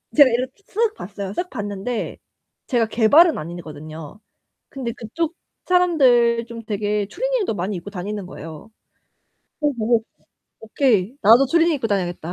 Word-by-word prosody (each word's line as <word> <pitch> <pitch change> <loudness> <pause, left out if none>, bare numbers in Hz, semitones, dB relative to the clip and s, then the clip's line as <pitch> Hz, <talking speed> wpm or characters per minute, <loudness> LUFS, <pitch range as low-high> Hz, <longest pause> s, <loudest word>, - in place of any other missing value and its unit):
제가 285 -3 +8
이렇게 255 +9 -3
쓱 435 +2 0
봤어요. 200 0 -6
쓱 355 - -3
봤는데 205 0 -4 0.5
제가 235 -4 +1
개발은 285 +10 +5
아니거든요. 155 0 -8 0.5
근데 255 -4 -5
그쪽 310 +10 -4 0.3
사람들 255 -10 +3
좀 230 -1 -8
되게 210 -1 -1
추리닝도 - - -1
많이 190 +2 -3
입고 175 +3 -8
다니는 200 +1 -5
거예요. 165 +3 -10 0.9
그거 295 -1 +1
보고 225 0 +2 0.6
'오케이. 225 -1 +1
나도 230 +6 +7
추리닝 335 +3 +3
입고 255 -5 -2
다녀야겠다.' 175 -5 -2
225 Hz, 320 characters per minute, -21 LUFS, 200-275 Hz, 0.9 s, 제가